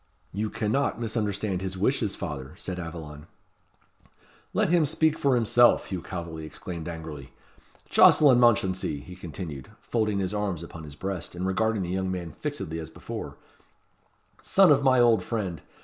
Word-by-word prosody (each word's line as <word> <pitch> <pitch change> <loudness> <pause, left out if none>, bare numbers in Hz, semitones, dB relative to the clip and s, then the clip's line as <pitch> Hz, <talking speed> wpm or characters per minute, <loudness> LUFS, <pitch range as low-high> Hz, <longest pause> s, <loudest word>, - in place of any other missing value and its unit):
"You 105 +2 -2
cannot 110 +4 0
misunderstand 105 -4 -2
his 95 0 -4
wishes, 105 +1 +1
father," 75 -5 -6
said 95 -3 -5
Aveline. 80 -3 -8 1.2
"Let - - +1
him 170 -1 +4
speak 155 +1 +2
for 140 -4 +2
himself," 120 +1 +4
Hugh 95 -3 -4
Calveley 85 -2 -6
exclaimed 85 +1 -7
angrily. 75 -5 -8 0.5
"Jocelyn 135 -5 +6
Mounchensey!" 95 - +2
he 90 - -11
continued, 80 -5 -7
folding 110 -3 -1
his 95 0 -1
arms 100 -6 -2
upon 80 -1 -9
his 75 -2 -10
breast, 95 0 -5
and 90 +2 -3
regarding 110 +2 +1
the 85 - -4
young 95 +1 -1
man 90 -3 -4
fixedly 95 - -4
as 80 -1 -7
before, 80 - -7 1.0
"son 195 -4 +5
of 140 -1 +5
my 130 -2 +5
old 115 -4 +5
friend! 95 -6 -3
95 Hz, 150 wpm, -27 LUFS, 85-115 Hz, 1.2 s, Jocelyn